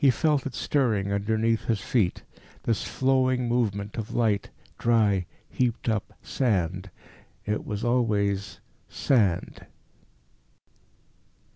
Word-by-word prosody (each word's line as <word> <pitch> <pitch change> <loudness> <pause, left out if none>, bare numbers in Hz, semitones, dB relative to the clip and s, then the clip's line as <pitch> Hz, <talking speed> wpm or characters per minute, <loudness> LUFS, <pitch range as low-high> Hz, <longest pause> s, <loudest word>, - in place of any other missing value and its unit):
He 140 - +7
felt 145 +3 +2
it 130 - -7
stirring 110 -8 +1
underneath 110 +2 0
his 110 -3 +1
feet 95 -1 0 0.4
this 115 -3 0
flowing 130 -1 +1
movement 105 -4 -1
of 110 - -5
light, 110 -4 +1 0.3
dry, 105 -6 +2 0.2
heaped 120 -2 -1
up 110 -3 -1
sand. 95 -6 -1 0.6
It 105 0 -2
was 105 0 -3
always 105 -5 0 0.3
sand. 105 -10 +1
110 Hz, 105 wpm, -26 LUFS, 100-125 Hz, 0.6 s, He